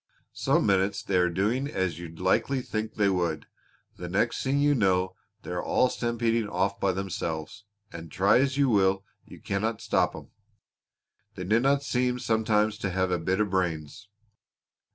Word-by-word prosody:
Some -, -, +1 dB
minutes 100 Hz, 0 st, +1 dB
they 95 Hz, -, 0 dB
are 90 Hz, -1 st, +3 dB
doing 105 Hz, +10 st, 0 dB
as 95 Hz, -, -2 dB
you'd 85 Hz, -2 st, -9 dB
likely 125 Hz, +8 st, +1 dB
think 110 Hz, -1 st, -4 dB
they 105 Hz, -2 st, +2 dB
would; 85 Hz, -5 st, -1 dB, 0.5 s
the 90 Hz, -, -6 dB
next 115 Hz, +6 st, 0 dB
thing 135 Hz, +1 st, +1 dB
you 145 Hz, +1 st, +3 dB
know 95 Hz, -6 st, +1 dB, 0.3 s
they -, -, -7 dB
are 90 Hz, 0 st, -2 dB
all 125 Hz, -, +2 dB
stampeding 115 Hz, -2 st, -1 dB
off 100 Hz, +2 st, -1 dB
by 100 Hz, -, +2 dB
themselves, 95 Hz, 0 st, -4 dB, 0.3 s
and 85 Hz, -1 st, -9 dB
try 100 Hz, +5 st, +4 dB
as 135 Hz, +1 st, +1 dB
you 140 Hz, -1 st, +3 dB
will 95 Hz, -3 st, +2 dB, 0.2 s
you -, -, -13 dB
cannot 110 Hz, +3 st, -2 dB
stop 110 Hz, -1 st, +1 dB
'em. -, -, -11 dB, 1.0 s
They 90 Hz, -, -5 dB
dinna 125 Hz, +8 st, +2 dB
seem 125 Hz, -2 st, 0 dB
sometimes 110 Hz, -2 st, +1 dB
to 100 Hz, -, -2 dB
have 95 Hz, 0 st, 0 dB
a 90 Hz, -, +1 dB
bit 95 Hz, +4 st, -1 dB
of 105 Hz, -3 st, 0 dB
brains." 85 Hz, 0 st, -2 dB
100 Hz, 170 wpm, -27 LUFS, 90-115 Hz, 1.0 s, try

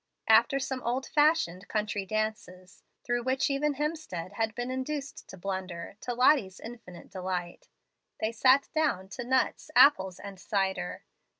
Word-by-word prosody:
After 275 Hz, -, +5 dB
some 265 Hz, -1 st, -3 dB
old 250 Hz, +3 st, -1 dB
fashioned 295 Hz, -, +2 dB
country 210 Hz, -2 st, -2 dB
dances 210 Hz, -4 st, -4 dB, 0.2 s
through 240 Hz, 0 st, 0 dB
which 260 Hz, +3 st, 0 dB
even 285 Hz, +1 st, 0 dB
Hemstead 295 Hz, -, -4 dB
had 225 Hz, 0 st, -1 dB
been 245 Hz, +1 st, -3 dB
induced 275 Hz, +2 st, -4 dB
to 190 Hz, -, -10 dB
blunder, 185 Hz, -2 st, -5 dB
to 245 Hz, -, -3 dB
Lottie's 245 Hz, -7 st, +3 dB
infinite 220 Hz, -7 st, -11 dB
delight 180 Hz, -2 st, -5 dB, 0.5 s
they 220 Hz, -, 0 dB
sat 260 Hz, +4 st, +4 dB
down 285 Hz, -12 st, 0 dB
to 245 Hz, +5 st, -6 dB
nuts, 260 Hz, +4 st, 0 dB
apples, 190 Hz, -11 st, +6 dB
and 200 Hz, -2 st, -9 dB
cider. 190 Hz, -, -2 dB
220 Hz, 140 wpm, -29 LUFS, 190-265 Hz, 0.5 s, apples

